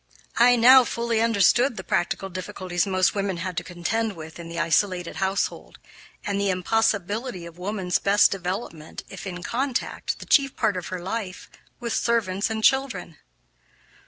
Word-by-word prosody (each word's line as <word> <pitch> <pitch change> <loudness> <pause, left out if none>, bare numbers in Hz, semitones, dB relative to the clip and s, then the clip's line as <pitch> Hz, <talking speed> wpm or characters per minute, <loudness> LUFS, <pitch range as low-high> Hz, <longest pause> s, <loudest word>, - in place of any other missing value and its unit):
I 245 +1 +6
now 255 +2 +8
fully 235 -1 -1
understood 230 +3 +3
the 190 - -5
practical 180 +2 -1
difficulties 185 0 -3
most 185 -1 +2
women 195 -3 -2
had 180 +1 -4
to 180 - -1
contend 185 +6 -2
with 160 0 -10
in 170 -1 -8
the 170 0 -5
isolated 175 +1 0
household, 190 +1 -2 0.5
and 200 -1 -1
the 200 - +1
impossibility 205 +1 0
of 170 +1 -12
woman's 185 -1 -1
best 200 +1 +4
development 180 -4 -5
if - - -8
in 180 -1 -6
contact, 255 +3 -2
the - - -10
chief 275 -3 +3
part 205 - +1
of 180 - -5
her 185 -1 -5
life, 190 -1 -5 0.3
with 235 -2 -3
servants 220 -4 0
and 220 0 -3
children. 245 - +1
195 Hz, 160 wpm, -24 LUFS, 180-230 Hz, 0.5 s, now